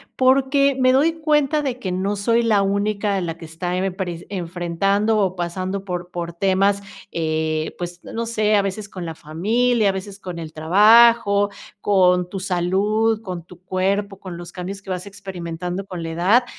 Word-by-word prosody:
porque 270 +1 +3
me 255 0 +5
doy 300 +5 +3
cuenta 300 -1 +2
de 255 -3 -3
que 185 -6 -3
no 195 +3 -1
soy 230 +3 +2
la 215 -3 +3
única 200 0 0
la 165 -1 -4
que 165 - -10
está 175 +3 -4
emepres 185 -2 -3
enfrentando 190 +4 0
o 190 -3 +1
pasando 185 +3 -3
por 180 -1 -5
por 170 -1 -4
temas, 195 +2 +2 0.3
eh, 155 -1 -1
pues, 175 0 -6
n - - -10
no 230 +1 -2
sé, 215 -2 +1
a 200 - +4
veces 200 +1 -4
con 180 -3 -7
la 165 -1 -5
familia, 215 +8 +1
a - - +3
veces 195 +1 -7
con 180 -3 -7
el 160 -1 -7
trabajo, 205 +4 +5 0.3
con 180 -3 +3
tu 195 - -5
salud, 200 +5 +1
con 180 -5 -6
tu 180 0 -15
cuerpo, 195 +2 -1
con 180 -3 -8
los 175 0 -9
cambios 195 +2 -6
que 190 - -13
vas 180 +1 -3
experimentando 180 -1 -6
con 180 -3 -6
la 165 - -4
edad. 190 +10 +3
195 Hz, 180 wpm, -21 LUFS, 175-215 Hz, 0.3 s, me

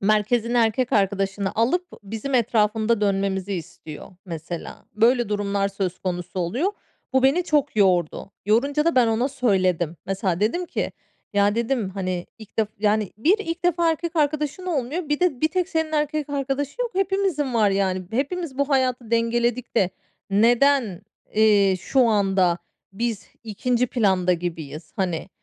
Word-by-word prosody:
merkezine 215 +4 +2
erkek 235 +3 +1
arkadaşını 195 -1 0
alıp, 260 +12 +1 0.2
bizim 225 +7 -5
etrafında 225 -1 +2
dönmemizi 195 -1 0
istiyor, 160 -2 -8 0.2
mesela. 165 0 -7
Böyle 235 +1 +3
durumlar 200 -1 0
söz 190 -2 -3
konusu 180 0 -4
oluyor. 255 - 0 0.4
Bu 265 0 +3
beni 290 +7 +3
çok 295 -6 +1
yordu. 185 -2 +2 0.2
Yorunca 280 +8 +2
da 335 - +2
ben 250 -2 +5
ona 230 +4 +1
söyledim. 185 - +1
Mesela 190 -2 -1
dedim 345 +12 0
ki, - - -3 0.4
ya, 205 +1 +3
dedim, 235 -2 0
hani, 185 -2 -3
ilk 220 0 -14
def 215 -2 +2
yani, 210 -1 +1
"Bir, 360 - +3
ilk 350 -3 -5
defa 340 -1 +3
erkek 330 +1 -3
arkadaşın 300 +4 0
olmuyor, 305 +1 -2
bir 295 +2 0
de, 340 -9 +1
bir 315 - +3
tek 365 +2 -1
senin 320 -3 -1
erkek 300 -1 -1
arkadaşın 280 - -2
yok. 475 - -3
Hepimizin 380 -9 0
var, 210 -3 +4
yani. 190 -1 0
Hepimiz 280 +3 -2
bu 280 0 +1
hayatı 255 -4 0
dengeledik 235 +1 0
de 190 -5 +3 0.4
neden, 235 -1 +3 0.3
eee, 205 -3 +4
şu 270 - +1
anda 195 -5 +2 0.3
biz 225 0 -3 0.2
2'nci 245 +3 0
planda 190 -7 +2
gibiyiz?" 165 -3 -5
hani. 180 -2 -2
225 Hz, 150 wpm, -23 LUFS, 195-280 Hz, 0.4 s, ben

